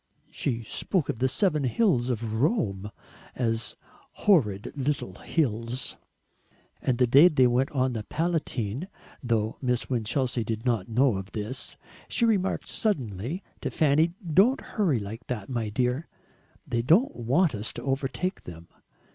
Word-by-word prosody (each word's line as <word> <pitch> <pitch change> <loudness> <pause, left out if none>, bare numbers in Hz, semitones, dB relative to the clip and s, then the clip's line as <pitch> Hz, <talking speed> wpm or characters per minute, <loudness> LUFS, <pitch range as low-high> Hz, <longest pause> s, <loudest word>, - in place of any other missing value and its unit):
She 120 -4 -2
spoke 175 - -1
of 110 - -2
the 130 - +3
Seven 155 0 +1
Hills 130 - +2
of 110 -2 -2
Rome 105 - 0 0.5
as 115 -3 -1 0.5
"horrid 105 - +3
little 140 -8 -2
hills!" 125 -4 -1 0.9
And 125 -2 +1
the 125 - +4
day 140 +8 +8
they 140 -7 +4
went 125 +2 +2
on 130 -2 0
the 110 - -3
Palatine 150 - -2 0.3
though 115 -3 0
Miss 125 -1 -1
Winchelsea 120 +1 0
did 110 +1 -4
not 115 -6 0
know 120 -1 +3
of 95 +1 -7
this 110 +5 -4 0.3
she 235 - +1
remarked 200 -4 +1
suddenly 135 - -2 0.2
to - - -2
Fanny, 155 +3 +2
"Don't 200 - +4
hurry 190 - 0
like 110 +3 -7
that, 110 -6 -4
my 115 -4 -2
dear; 125 +7 0 0.6
THEY 120 -1 0
don't 175 - +4
want 135 +8 +2
us 105 0 -3
to - - -7
overtake 135 +7 -2
them. 85 -1 -11
125 Hz, 145 wpm, -27 LUFS, 115-155 Hz, 0.9 s, day